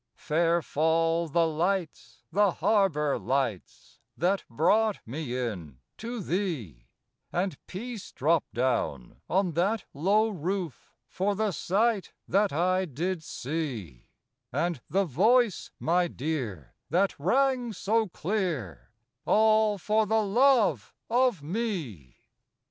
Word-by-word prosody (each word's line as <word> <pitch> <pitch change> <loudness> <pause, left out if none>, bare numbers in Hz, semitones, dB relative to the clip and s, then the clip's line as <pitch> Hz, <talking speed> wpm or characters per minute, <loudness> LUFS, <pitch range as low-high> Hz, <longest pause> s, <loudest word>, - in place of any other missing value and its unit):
Fair 170 +2 +1
fall 165 +3 +1
the 165 +2 +2
lights, 170 +2 -2
the 200 +1 +3
harbor 160 -9 +2
lights, 130 -8 -3 0.2
That 190 +4 +1
brought 210 - +2
me 130 0 -4
in 90 - -4 0.2
to 235 0 -5
thee, 140 - -3 0.4
And 180 -2 -1
peace 225 +2 -7
drop 160 +3 +2
down 120 - -2
on 185 -1 +2
that 185 +6 0
low 205 +9 +2
roof 180 - -4 0.2
For 200 +2 -1
the 215 0 0
sight 205 +4 0
that 200 +1 +2
I 185 +4 +1
did 170 +4 -3
see, 125 - -5 0.4
And 170 -6 -1
the 195 +2 +2
voice, 215 - +2
my 175 +2 +2
dear, 125 - -4 0.2
that 185 +6 +2
rang 250 - +2
so 220 +2 0
clear 165 - -3 0.4
All 215 -1 +4
for 215 +3 +1
the 220 +1 +2
love 210 - +3 0.2
of 245 - +2
me. 155 - -4
175 Hz, 115 wpm, -28 LUFS, 145-210 Hz, 0.4 s, All